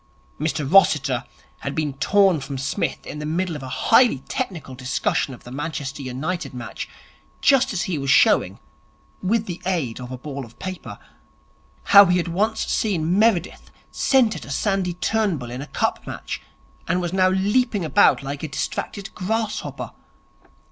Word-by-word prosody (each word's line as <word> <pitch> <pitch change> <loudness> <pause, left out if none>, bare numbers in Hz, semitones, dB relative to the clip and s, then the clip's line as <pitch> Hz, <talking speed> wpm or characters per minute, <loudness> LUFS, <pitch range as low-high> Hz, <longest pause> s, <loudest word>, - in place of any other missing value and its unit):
Mr 155 -1 -1
Rossiter 140 -8 +4 0.3
had 140 - -4
been 150 -3 -1
torn 190 +5 +3
from 140 0 -6
Psmith 135 +1 -2
in 150 - -6
the 150 - -4
middle 170 +1 -1
of 150 - -6
a 130 - -7
highly 225 - +4
technical 180 - -4
discussion 130 +2 -1
of 125 - -11
the 120 - -11
Manchester 145 -1 -4
United 135 +3 -4
match, 120 -2 -6 0.5
just 270 -3 +4
as 190 -4 -1
he 170 -5 -2
was 135 0 -3
showing - - +4 0.6
with 215 +4 +1
the 175 -3 -6
aid 165 -12 -1
of 125 0 -7
a 130 - -5
ball 140 +1 -6
of 115 -1 -14
paper 185 -1 -7 0.9
how 200 -2 +8
he 180 +1 +3
had 175 - -1
once 215 +6 0
seen 180 -3 0
Meredith 210 -5 +1 0.2
centre 235 -9 +2
to - - -11
Sandy 185 +3 0
Turnbull 180 - -1
in 125 +2 -5
a 145 - -7
Cup - - -2
match, - - -5 0.5
and 180 +2 +1
was 175 -1 -3
now 185 -1 +4
leaping 205 +1 +1
about 140 -1 +4
like 140 +1 -5
a 160 - -3
distracted 195 +8 -4
grasshopper. 220 +3 -3
170 Hz, 160 wpm, -23 LUFS, 140-195 Hz, 0.9 s, how